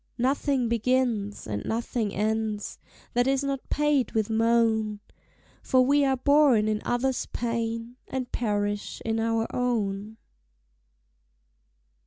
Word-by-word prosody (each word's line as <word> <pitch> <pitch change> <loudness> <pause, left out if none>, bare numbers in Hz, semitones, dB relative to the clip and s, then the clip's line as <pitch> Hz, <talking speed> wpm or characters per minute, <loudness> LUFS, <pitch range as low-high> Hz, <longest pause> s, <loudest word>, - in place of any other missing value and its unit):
Nothing 265 0 +1
begins, 235 -3 0
and 105 -1 -4
nothing 225 -1 -2
ends, 215 +1 -2 0.3
That 245 +1 +2
is 270 0 +1
not 275 -1 -3
paid 295 -5 +1
with 220 -1 0
moan; 220 -2 +2 0.6
For 255 -1 +3
we 285 +2 +4
are 265 -1 +2
born 280 -5 +4
in 215 0 0
others' 250 +2 0
pain, 230 0 -3
And 255 -2 -4
perish 205 -2 -2
in 225 0 0
our 225 0 +1
own. 215 -4 -1
230 Hz, 115 wpm, -26 LUFS, 215-255 Hz, 0.6 s, we